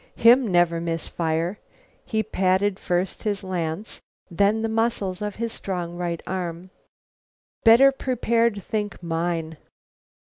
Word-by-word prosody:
Him 235 Hz, -1 st, +5 dB
never 175 Hz, -1 st, +3 dB
miss 165 Hz, -1 st, -3 dB
fire." 165 Hz, +4 st, -2 dB, 0.4 s
He 220 Hz, -1 st, -1 dB
patted 190 Hz, +1 st, +1 dB
first 180 Hz, +1 st, -1 dB
his 205 Hz, -3 st, -2 dB
lance, 180 Hz, +1 st, -4 dB, 0.3 s
then 200 Hz, +5 st, +2 dB
the -, -, +1 dB
muscles 220 Hz, -4 st, -1 dB
of 210 Hz, -1 st, -3 dB
his 230 Hz, 0 st, -3 dB
strong 175 Hz, -3 st, -4 dB
right 175 Hz, -1 st, -3 dB
arm. 180 Hz, -1 st, -4 dB, 0.9 s
"Better 245 Hz, +4 st, +7 dB
prepared 235 Hz, -5 st, 0 dB
think 210 Hz, -4 st, -4 dB
mine." 165 Hz, -1 st, -2 dB
190 Hz, 125 wpm, -24 LUFS, 170-220 Hz, 0.9 s, Better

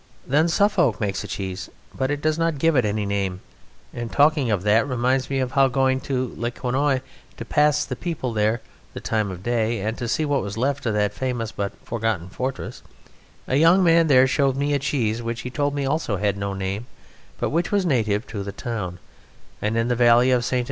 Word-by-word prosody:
Then 150 Hz, +5 st, +3 dB
Suffolk 175 Hz, -, +2 dB
makes 100 Hz, -2 st, -2 dB
a -, -, -7 dB
cheese, 95 Hz, -1 st, -5 dB, 0.3 s
but 140 Hz, +2 st, -1 dB
does 155 Hz, +1 st, +1 dB
not 165 Hz, -2 st, +1 dB
give 165 Hz, +2 st, +2 dB
it 125 Hz, -4 st, +3 dB
any 105 Hz, 0 st, -1 dB
name; 100 Hz, -2 st, -2 dB, 0.5 s
and 120 Hz, -1 st, -5 dB
talking 145 Hz, -3 st, +3 dB
of 100 Hz, -4 st, 0 dB
that 110 Hz, +4 st, +3 dB
reminds 130 Hz, 0 st, 0 dB
me 135 Hz, -, -1 dB
how 130 Hz, +1 st, +3 dB
going 130 Hz, 0 st, +1 dB
to 130 Hz, -2 st, -2 dB
Le 120 Hz, +2 st, -1 dB
Quesnoy 130 Hz, +2 st, 0 dB, 0.4 s
to -, -, -6 dB
pass 150 Hz, 0 st, +2 dB
the 125 Hz, -, -4 dB
people 130 Hz, -4 st, -3 dB
there 110 Hz, +2 st, +1 dB, 0.3 s
the -, -, -4 dB
time 110 Hz, -2 st, -1 dB
of 90 Hz, -1 st, -8 dB
day, 115 Hz, -1 st, 0 dB
and 110 Hz, +3 st, -2 dB
to 120 Hz, -, -3 dB
see 155 Hz, +6 st, 0 dB
what 145 Hz, -2 st, +1 dB
was 100 Hz, +1 st, -5 dB
left 135 Hz, +1 st, -1 dB
of 110 Hz, -, 0 dB
that 105 Hz, -1 st, +1 dB
famous 120 Hz, -2 st, -3 dB
but 100 Hz, -3 st, -3 dB
forgotten 110 Hz, -6 st, -2 dB
fortress, 130 Hz, +7 st, -5 dB, 0.6 s
a 130 Hz, -, +1 dB
young 170 Hz, +5 st, +5 dB
man 165 Hz, -1 st, +5 dB
there 130 Hz, -3 st, +6 dB
showed 135 Hz, 0 st, +1 dB
me 145 Hz, +1 st, 0 dB
a 140 Hz, -, +2 dB
cheese, 120 Hz, -5 st, -1 dB
which 115 Hz, 0 st, -4 dB
he 125 Hz, -, -6 dB
told 145 Hz, +1 st, -1 dB
me 140 Hz, -1 st, -1 dB
also 135 Hz, -7 st, -1 dB
had 100 Hz, 0 st, 0 dB
no 100 Hz, -1 st, -3 dB
name, 95 Hz, +4 st, -4 dB, 0.5 s
but -, -, -2 dB
which 170 Hz, +3 st, 0 dB
was 200 Hz, -2 st, +2 dB
native 110 Hz, -7 st, +1 dB
to 105 Hz, -6 st, -6 dB
the 100 Hz, 0 st, -5 dB
town, 100 Hz, -5 st, -5 dB, 0.6 s
and 105 Hz, +2 st, 0 dB
in 115 Hz, +1 st, +1 dB
the 120 Hz, -, +1 dB
valley 120 Hz, +1 st, +5 dB
of 125 Hz, -1 st, +2 dB
Ste. 125 Hz, -, -1 dB
125 Hz, 210 wpm, -23 LUFS, 105-140 Hz, 0.6 s, there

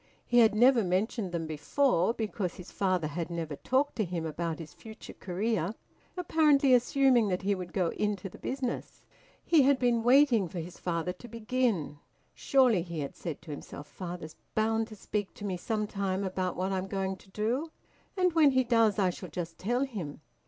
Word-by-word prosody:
He 240 Hz, -, +4 dB
had 220 Hz, -3 st, +5 dB
never 245 Hz, +1 st, +5 dB
mentioned 190 Hz, +2 st, -1 dB
them 170 Hz, -2 st, -2 dB
before, 175 Hz, -, +1 dB
because 205 Hz, -5 st, -3 dB
his 180 Hz, -, -11 dB
father 185 Hz, -4 st, 0 dB
had 165 Hz, +3 st, -3 dB
never 165 Hz, -3 st, -4 dB
talked 270 Hz, -, 0 dB
to 220 Hz, -, +2 dB
him 170 Hz, -3 st, -3 dB
about 165 Hz, 0 st, -3 dB
his 160 Hz, -3 st, -9 dB
future 220 Hz, -1 st, -11 dB
career, 200 Hz, +1 st, -2 dB, 0.4 s
apparently 300 Hz, -6 st, +4 dB
assuming 250 Hz, -1 st, +4 dB
that 185 Hz, -1 st, -1 dB
he 200 Hz, +1 st, +2 dB
would 180 Hz, -2 st, -5 dB
go 180 Hz, -4 st, +1 dB
into 205 Hz, 0 st, -2 dB
the 180 Hz, -, -12 dB
business. 260 Hz, -2 st, -4 dB, 0.4 s
He 325 Hz, -3 st, +5 dB
had 275 Hz, 0 st, +4 dB
been 245 Hz, -2 st, +2 dB
waiting 245 Hz, -4 st, +5 dB
for 175 Hz, -, -8 dB
his 170 Hz, +2 st, -8 dB
father 175 Hz, 0 st, -2 dB
to 210 Hz, +6 st, -12 dB
begin. 230 Hz, -, -1 dB, 0.3 s
"Surely," 255 Hz, -9 st, +3 dB
he 170 Hz, -2 st, -5 dB
had 140 Hz, -, -5 dB
said 165 Hz, -2 st, -6 dB
to 160 Hz, -, -8 dB
himself 145 Hz, 0 st, -8 dB
"father's 175 Hz, -3 st, -7 dB, 0.2 s
bound 225 Hz, +1 st, +1 dB
to 220 Hz, -, -10 dB
speak 205 Hz, -1 st, -4 dB
to 205 Hz, -, -7 dB
me 190 Hz, -2 st, -1 dB
sometime 200 Hz, -1 st, -2 dB
about 185 Hz, -1 st, -2 dB
what 185 Hz, +2 st, -1 dB
I'm 190 Hz, 0 st, -2 dB
going 190 Hz, 0 st, -2 dB
to 190 Hz, -, -20 dB
do, 235 Hz, +11 st, -1 dB, 0.5 s
and 365 Hz, -2 st, +3 dB
when 315 Hz, -3 st, +6 dB
he 260 Hz, -1 st, +3 dB
does 230 Hz, -4 st, +3 dB
I 190 Hz, -3 st, +3 dB
shall 180 Hz, 0 st, -9 dB
just 165 Hz, +1 st, -6 dB
tell 245 Hz, +6 st, 0 dB
him." 185 Hz, -, -6 dB
200 Hz, 190 wpm, -30 LUFS, 175-240 Hz, 0.5 s, when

